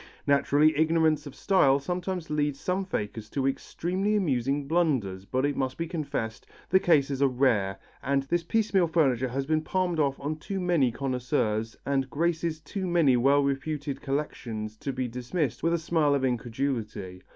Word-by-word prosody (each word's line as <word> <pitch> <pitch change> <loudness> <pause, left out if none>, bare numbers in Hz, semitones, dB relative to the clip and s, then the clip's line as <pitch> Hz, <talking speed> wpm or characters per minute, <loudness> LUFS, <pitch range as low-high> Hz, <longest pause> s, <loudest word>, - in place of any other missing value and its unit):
Naturally, 145 +2 +4
ignorance 160 -1 +2
of 140 - -10
style 140 -6 +4
sometimes 180 +3 -4
leads 145 -2 0
some 185 +1 -1
fakers 110 - -4
to 135 +2 -1
extremely 185 +9 -1
amusing 140 - 0
blunders, 130 - 0
but 130 +6 0
it 145 -1 0
must 130 -1 -2
be 165 - -2
confessed 145 -9 -4 0.2
the 190 - +5
cases 140 -6 +2
are 140 - +6
rare, 120 -7 +1 0.2
and 140 0 +1
this 170 +5 0
piecemeal 195 0 +2
furniture 135 -7 +2
has 135 +2 -2
been 155 +1 +1
palmed 175 0 -1
off 140 -2 +1
on 150 +2 -3
too 195 +5 -4
many 170 -9 +2
connoisseurs, 115 -4 -1
and 135 -1 0
graces 165 +2 -1
too 190 +3 -4
many 165 -7 +4
well 140 +4 +4
reputed 140 0 -2
collections 115 -7 -3
to 135 +5 -4
be 130 -1 -2
dismissed 125 +5 -2
with 165 - +1
a - - +3
smile 160 -3 +2
of 135 - -1
incredulity. 115 -6 -3
140 Hz, 165 wpm, -27 LUFS, 130-165 Hz, 0.2 s, are